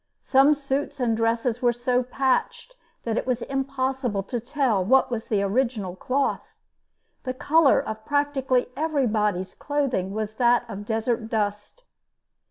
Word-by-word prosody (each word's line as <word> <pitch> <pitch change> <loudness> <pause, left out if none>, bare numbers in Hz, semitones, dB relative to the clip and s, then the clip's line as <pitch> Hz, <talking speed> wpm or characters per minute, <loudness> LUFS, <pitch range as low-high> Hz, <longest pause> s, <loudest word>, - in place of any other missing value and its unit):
Some 275 +3 +5
suits 280 0 -3
and 235 -3 +1
dresses 230 +1 0
were 245 -1 +4
so 245 +1 0
patched 265 - -1 0.3
that 230 -1 -1
it - - -6
was 250 -2 0
impossible 265 -5 -2
to 240 +5 -3
tell 245 -5 0
what 260 +6 +3
was 225 -2 -3
the 205 -2 +1
original 210 -3 -1
cloth. 265 +8 -2 0.7
The 255 -1 -4
color 310 +2 +4
of 220 0 -5
practically 275 -3 0
everybody's 215 - 0
clothing 275 -10 -1
was 215 +1 -3
that 240 0 +3
of 205 -2 -7
desert 225 0 -1
dust. 210 - -3
245 Hz, 140 wpm, -25 LUFS, 220-270 Hz, 0.7 s, Some